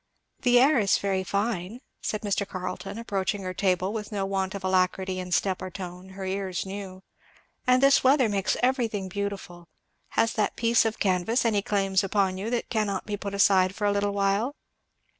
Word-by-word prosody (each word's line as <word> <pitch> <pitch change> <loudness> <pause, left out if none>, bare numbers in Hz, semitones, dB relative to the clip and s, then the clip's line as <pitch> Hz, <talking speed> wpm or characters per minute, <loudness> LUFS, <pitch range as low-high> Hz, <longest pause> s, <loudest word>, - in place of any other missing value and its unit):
"The 245 -1 +5
air 270 +1 +5
is 200 -3 +3
very 195 -1 -1
fine," 200 +1 -2 0.2
said 215 - -2
Mr. 200 -1 -1
Carleton 185 +2 -5
approaching 200 -3 -2
her 185 0 -4
table, 185 0 0
with 215 -1 -5
no 200 -2 -1
want 195 0 -2
of 195 - -6
alacrity 185 0 +1
in 180 0 -6
step 190 +1 +1
or 185 - -4
tone, 180 0 -8
her 190 - -5
ears 190 -1 -2
knew; 190 -1 -7 0.6
"and 255 +1 +4
this 275 0 +5
weather 265 -1 +5
makes 200 -2 0
everything 230 -7 0
beautiful 195 -3 -5 0.5
has 230 - +3
that 215 - 0
piece 230 0 +3
of 220 0 -1
canvas 195 +6 +1
any 210 -3 +2
claims 195 -1 +1
upon 195 -1 0
you 210 +4 -3
that 240 0 -2
cannot 205 -4 -1
be 210 - -3
put 200 0 -5
aside 190 -1 +4
for 210 - -2
a 205 - +3
little?" 200 +5 0
200 Hz, 180 wpm, -26 LUFS, 190-215 Hz, 0.6 s, The